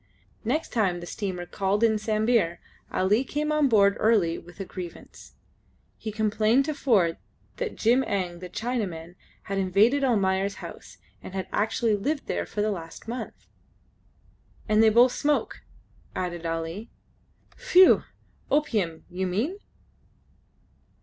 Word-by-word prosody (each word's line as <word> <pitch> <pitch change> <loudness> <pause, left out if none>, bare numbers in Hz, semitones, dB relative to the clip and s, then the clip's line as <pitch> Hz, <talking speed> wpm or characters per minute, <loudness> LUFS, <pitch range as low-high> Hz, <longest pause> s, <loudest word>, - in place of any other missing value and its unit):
Next 280 +8 -1
time 190 -6 +1
the 175 - -8
steamer 185 -2 -4
called 200 +4 -1
in 220 -2 +3
Sambir 215 -4 +1 0.3
Ali 205 +6 +2
came 300 +3 -2
on 305 -2 +3
board 200 -3 +4
early 200 -7 +2
with 175 +3 -16
a 195 - -4
grievance. 180 -2 -10 0.6
He 220 - -6
complained 220 +4 +2
to 310 - -2
Ford 200 - +2 0.4
that 480 -2 -3
Jim 245 +4 +3
Eng 180 -4 -2
the 180 0 -8
Chinaman 185 -8 -3 0.3
had 195 0 -3
invaded 205 +9 +3
Almayer's 195 -5 +1
house, 165 - -10 0.2
and 190 - -9 0.2
actually 220 +2 +1
had 205 -1 0
lived 295 +2 -1
there - - -2
for 210 - -2
the 215 - +1
last 165 +1 -8
month. 240 +2 -6 1.2
"And 215 0 +4
they 225 - +7
both 240 +3 +5
smoke," 295 +2 -1 0.5
added 175 -2 -3
Ali. 165 +7 -4 0.7
"Phew! 365 0 +6 0.5
Opium, 210 - 0
you 185 +1 -3
mean?" 245 - -2
210 Hz, 135 wpm, -26 LUFS, 180-235 Hz, 1.2 s, they